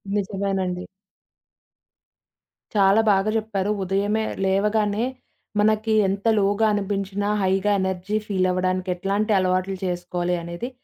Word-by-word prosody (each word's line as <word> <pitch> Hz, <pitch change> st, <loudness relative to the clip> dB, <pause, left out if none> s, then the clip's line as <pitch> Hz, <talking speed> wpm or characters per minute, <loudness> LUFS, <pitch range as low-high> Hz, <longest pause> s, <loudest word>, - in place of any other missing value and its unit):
నిజమేనండి. 195 Hz, -2 st, -2 dB, 1.9 s
చాలా 200 Hz, +1 st, +5 dB
బాగా 195 Hz, +1 st, +2 dB
జెప్పారు. 210 Hz, -2 st, -1 dB
ఉదయమే 200 Hz, +3 st, 0 dB, 0.2 s
లేవగానే 210 Hz, +3 st, +1 dB, 0.5 s
మనకి 215 Hz, +1 st, +2 dB
ఎంత 195 Hz, +2 st, -3 dB
లోగా 205 Hz, +2 st, +2 dB
అనిపించినా, 200 Hz, 0 st, -2 dB, 0.2 s
హైగా 190 Hz, +2 st, +2 dB
ఎనర్జీ 190 Hz, +2 st, -1 dB
ఫీలవ్వడానికి 185 Hz, -1 st, 0 dB
ఎట్లాంటి 200 Hz, +4 st, -1 dB
అలవాట్లు 185 Hz, +1 st, 0 dB
చేసుకోవాలి 175 Hz, 0 st, -2 dB
అనేది 170 Hz, +8 st, -5 dB
195 Hz, 95 wpm, -23 LUFS, 185-205 Hz, 1.9 s, చాలా